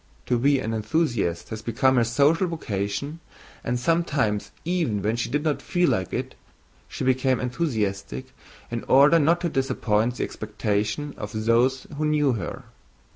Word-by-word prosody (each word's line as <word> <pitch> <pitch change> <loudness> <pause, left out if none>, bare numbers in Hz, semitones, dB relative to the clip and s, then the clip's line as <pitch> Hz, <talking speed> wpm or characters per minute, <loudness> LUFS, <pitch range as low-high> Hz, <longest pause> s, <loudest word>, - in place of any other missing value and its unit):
To 125 -2 +1
be 140 +3 +4
an 115 -3 -2
enthusiast 110 - -1
had 110 -1 -6
become 130 +3 +2
her 120 - +5
social 145 +10 +3
vocation 140 - -3 0.4
and, 120 0 -1
sometimes 140 -9 0 0.2
even 160 - 0
when 110 +2 +1
she 120 - -2
did 145 +1 -1
not 155 -2 0
feel 175 -1 +1
like 95 -1 -1
it, - - -3 0.5
she - - -5
became 130 -1 +2
enthusiastic 105 - -2 0.4
in 115 -1 -3
order 145 +5 +6
not 165 +3 +3
to 175 - 0
disappoint 120 -4 0
the - - -2
expectations 110 +6 -2
of 110 +1 -4
those 125 +3 +2
who 155 - +1
knew 150 -2 +2
her. 100 -6 -5
125 Hz, 155 wpm, -25 LUFS, 110-150 Hz, 0.5 s, order